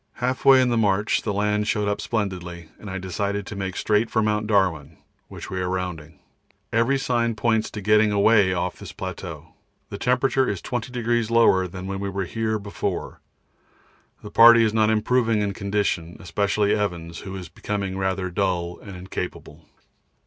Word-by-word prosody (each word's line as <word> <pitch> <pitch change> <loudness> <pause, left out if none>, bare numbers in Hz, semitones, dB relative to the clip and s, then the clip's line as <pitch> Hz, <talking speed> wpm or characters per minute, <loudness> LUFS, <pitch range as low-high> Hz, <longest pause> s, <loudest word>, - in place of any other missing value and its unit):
Half 125 +1 -3
way 135 -1 +8
in 125 - +1
the 120 - +1
march 105 0 +2
the 110 - -2
land 105 +1 0
showed 105 -1 0
up 105 - -1
splendidly, 90 -6 -4
and 105 - -9
I 95 - -4
decided 100 +2 -3
to - - -7
make 95 -2 -4
straight 110 +1 +1
for 110 - +1
Mt. 105 0 0
Darwin, 85 -8 +1 0.3
which - - -9
we 95 - -2
are 90 - -1
rounding. 85 -4 -4 0.6
Every 115 +5 +3
sign 120 -3 0
points 110 -1 +1
to 105 - -7
getting 105 +1 +4
away 100 -1 +4
off 90 0 -2
this - - -9
plateau. - - -7 0.4
The - - -6
temperature 130 +1 +2
is 100 - -2
20° 120 -1 -2
lower 115 -6 +4
than 95 +1 -8
when 95 0 -4
we 100 0 -3
were 95 0 -3
here 110 +3 -2
before; 100 -1 -4 1.0
the 105 - -9
party 115 +1 +8
is 110 -1 +1
not 110 -1 +3
improving 115 +1 +2
in 100 -1 -2
condition, 100 -4 -2
especially 100 +3 0
Evans, 85 -5 -3
who 95 -1 -7
is 90 -3 -7
becoming 100 +3 -4
rather 95 -1 -2
dull 90 -2 -1
and 100 -2 -10
incapable. 90 +1 -7
100 Hz, 175 wpm, -23 LUFS, 95-110 Hz, 1.0 s, way